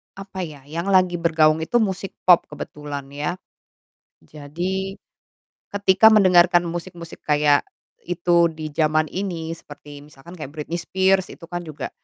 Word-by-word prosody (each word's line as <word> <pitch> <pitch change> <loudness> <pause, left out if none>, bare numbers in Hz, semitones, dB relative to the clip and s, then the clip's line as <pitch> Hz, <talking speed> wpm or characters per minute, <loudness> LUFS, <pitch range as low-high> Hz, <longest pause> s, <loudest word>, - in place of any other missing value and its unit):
apa 195 -1 -9
ya, 145 -3 -13
yang 165 +6 -5
lagi 185 -2 +3
bergaung 160 -2 +3
itu 160 +8 -4
musik 195 -1 -4
pop 180 -2 +5
kebetulan 145 -1 -7
ya. 150 +5 -3 0.9
Jadi 175 - -4 0.8
ketika 200 +1 +4
mendengarkan 180 -3 +5
musik-musik 170 -1 -8
kayak 145 -1 +3 0.4
itu 175 0 +2
di 155 -1 -6
zaman 155 +1 +1
ini 175 -4 -4
seperti 145 0 -12
misalkan 150 +5 -14
kayak 145 -3 -7
Britney 160 +3 -4
Spears 190 +1 +1
itu - - -25
kan 175 -1 -5
juga, 150 -3 -6
170 Hz, 135 wpm, -22 LUFS, 150-185 Hz, 0.9 s, pop